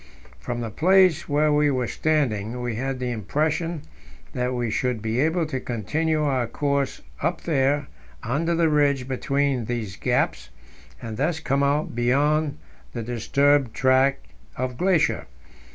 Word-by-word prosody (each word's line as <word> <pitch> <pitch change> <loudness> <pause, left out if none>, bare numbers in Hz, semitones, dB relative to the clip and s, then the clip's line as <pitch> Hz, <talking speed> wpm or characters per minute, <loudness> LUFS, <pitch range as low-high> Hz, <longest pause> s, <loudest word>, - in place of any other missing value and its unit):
From 120 -1 -4
the 115 -2 -4
place 180 - +3
where 150 +1 +3
we 150 0 +3
were 130 -3 0
standing, 125 -6 -1
we 120 -1 -2
had 135 +4 -3
the 125 -1 -3
impression 150 - -1 0.5
that 125 -2 -1
we 120 -2 -1
should 125 +1 -1
be 110 +3 -2
able 160 +4 +1
to 135 -4 -3
continue 150 +8 -1
our 130 -5 0
course 140 +2 -1 0.2
up 170 +3 -1
there 145 -2 +1 0.4
under 155 +8 0
the 165 0 +3
ridge 145 -4 +2
between 135 -1 0
these 110 -4 -4
gaps, - - 0 0.5
and 110 -2 -5
thus 160 +5 0
come 140 -1 0
out 140 +2 +1
beyond 145 +5 +1 0.4
the 120 - -4
disturbed 135 +2 +1
tract 130 +1 +3 0.3
of 130 -1 -2
glacier. 180 +2 +1
140 Hz, 145 wpm, -24 LUFS, 120-150 Hz, 0.5 s, place